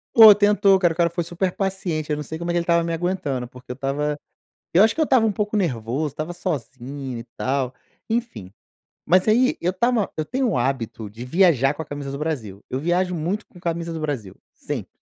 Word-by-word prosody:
Ô, 220 -2 +11
tentou, 205 -1 +4
cara, 175 -3 +2
o - - -15
cara 170 -1 +3
foi 170 +1 -2
super 175 +3 -1
paciente. 180 -6 -2
Eu - - +2
não 150 - -4
sei 160 +2 -6
como 170 +1 -3
é - - -1
que 175 - +1
ele - - -1
estava 170 0 +3
me 165 0 -2
aguentando, 165 -8 -2
porque 125 +1 -11
eu - - -2
estava 145 +3 -2 0.6
eu 190 +5 +7
acho 225 - +3
que - - -3
eu - - +5
estava 255 -6 +4
um 215 - +1
pouco 210 +2 -1
nervoso, 140 - -1
estava 155 +4 -4
sozinho 135 - -5
e 115 - -7
tal, 130 -1 -1 0.3
enfim. 225 - -3 0.5
Mas, 185 +3 +4
aí, 250 +4 +4
eu 180 - +1
estava 235 +1 +1
eu 155 - -1
tenho 260 - 0
o 190 - 0
hábito 120 -4 -2
de 110 +4 -9
viajar 145 -2 +3
com 155 - -6
a - - -6
camisa 145 -1 -6
do 140 - -4
Brasil, 130 -11 -4
eu 130 - -2
viajo 180 +4 0
muito 180 +7 -2
com - - -18
camisa 170 -1 -2
do 160 - -5
Brasil, 130 -11 -4 0.2
sempre. - - -6
165 Hz, 225 wpm, -23 LUFS, 135-190 Hz, 0.6 s, Ô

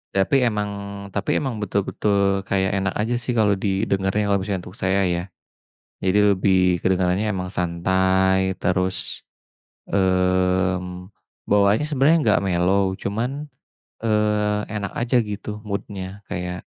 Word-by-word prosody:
Tapi 95 +7 +2
emang 105 -2 -1 0.4
tapi 100 +1 -1
emang 130 -6 -3
betul-betul 100 -1 0
kayak 95 -1 +1
enak 95 0 -1
aja 110 +3 -1
sih, 125 +1 -3
kalau 105 -3 +3
didengerin, 100 0 0
kalau 100 0 +3
misalnya 95 -1 -3
untuk 90 - -13
saya, 95 +1 +1
ya. 85 0 -1 0.8
Jadi 95 +2 +2 0.2
lebih 95 0 +2 0.2
kedengarannya 95 +2 +1
emang 90 -2 -3
santai, 95 +2 +1
terus, 90 +1 -1 0.7
mmm, 90 0 0 0.3
bawaannya 105 +5 +3
sebenarnya 150 +2 +3
nggak 105 -3 +3
mellow 95 +1 +1
cuman, 110 +6 -2 0.7
eee, 105 -1 +1
enak 105 -2 -4
aja 120 +2 +1
gitu 105 0 -6
mood-nya, 100 -1 -5
kayak 90 0 -4
95 Hz, 120 wpm, -22 LUFS, 95-105 Hz, 0.8 s, kalau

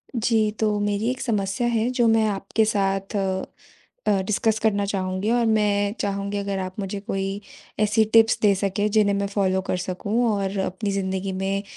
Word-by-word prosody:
जी, 220 -2 +2
तो 210 -1 +1
मेरी 205 +2 0
एक 255 +1 -3
समस्या 210 0 -1
है 230 0 +1
जो 245 -2 +2
मैं 225 -1 +4
आपके 210 +2 0
साथ 195 -1 -1
अ 190 -1 -1 0.6
अ, 195 -2 +3
डिस्कस 215 +2 +1
करना 205 -2 +1
चाहूँगी। 190 0 -2
और 240 0 +2
मैं 205 -2 +2
चाहूँगी 200 0 -2
अगर 200 -1 -2
आप 185 +1 -5
मुझे 200 0 -3
कोई 195 0 -3 0.4
ऐसी 215 +1 +3
टिप्स 225 0 +5
दे 205 -2 +5
सकें 200 +2 0
जिन्हें 205 -1 +3
मैं 200 0 -1
फ़ॉलो 190 -2 0
कर - - 0
सकूँ 200 +6 -1
और 200 -1 -2
अपनी 190 +2 -2
ज़िन्दगी 190 0 -2
में 195 +1 -2
200 Hz, 180 wpm, -23 LUFS, 195-220 Hz, 0.6 s, टिप्स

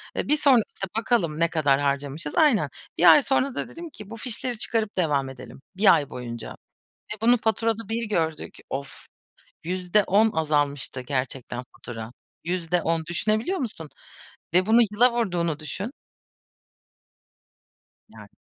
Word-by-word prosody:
Eee, - - -2
bir 300 - +3
sonra, 270 -5 +5
işte, 195 - -4
bakalım 195 -9 0
ne 170 0 +3
kadar 145 -4 +2
harcamışız." 145 +2 -2
Aynen. 295 -8 +4 0.3
1 - - +8
ay 295 - +7
sonra 270 0 0
da - - -4
dedim 335 0 -9
ki, 210 -7 -12
"Bu 225 - -7
fişleri 245 +1 -4
çıkarıp 220 -2 -1
devam 145 -6 +1
edelim 130 0 -11
bir 200 +1 +6
ay 145 - 0
boyunca." 120 -2 -7 0.6
ve - - -9
bunu 240 +2 +5
faturada 225 -1 -1
bir 225 0 -2
gördük. 160 -6 -2
Off! 140 +1 -6 0.6
%10 185 +4 +2
azalmıştı 145 -4 -1
gerçekten 130 -1 -3
fatura. 115 -1 -7 0.3
%10 165 -1 -1
düşünebiliyor 220 - 0
musun? 185 - -5 0.7
Ve 185 +1 +4
bunu 225 +2 +5
yıla 240 +4 +4
vurduğunu 175 -9 -1
düşün. 190 +8 -4 2.3
Evet. - - -12
180 Hz, 135 wpm, -25 LUFS, 145-225 Hz, 2.3 s, 1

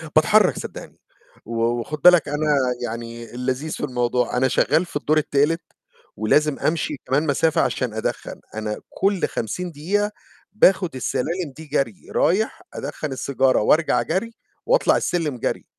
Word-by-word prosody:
باتحرّك 210 +4 +5
صدّقني، - - -9 0.5
و 115 0 -3
وخُد 120 +6 -1
بالك 175 -2 +7
أنا 150 0 +1 0.3
يعني 115 0 -6
اللذيذ 130 +5 -2
في - - -5
الموضوع، 125 -1 0
أنا 130 +1 +3
شغّال 155 +6 +2
في - - -15
الدور 150 +1 +1
التالت 150 +2 +1 0.6
ولازم 145 +8 +2
أمشي 155 -1 0
كمان 135 +5 +1
مسافة 160 +3 +2
عشان 125 -4 -1
أدخّن، 110 - -4 0.2
أنا 110 -1 -3
كلّ 195 -1 0
50 175 - -4
دقيقة 200 +8 -1 0.4
باخد 185 -6 +3
السلالم 145 +6 -2
دي 160 - -9
جَري، 150 +5 -2
رايح 215 - +1
أدخّن 155 - -5
السيجارة 135 -1 +1
وأرجع 150 +1 +3
جَري، 190 - -2 0.3
وأطلع - - +3
السلم 160 -7 -1
جَري، - - -3
150 Hz, 140 wpm, -22 LUFS, 125-170 Hz, 0.6 s, بالك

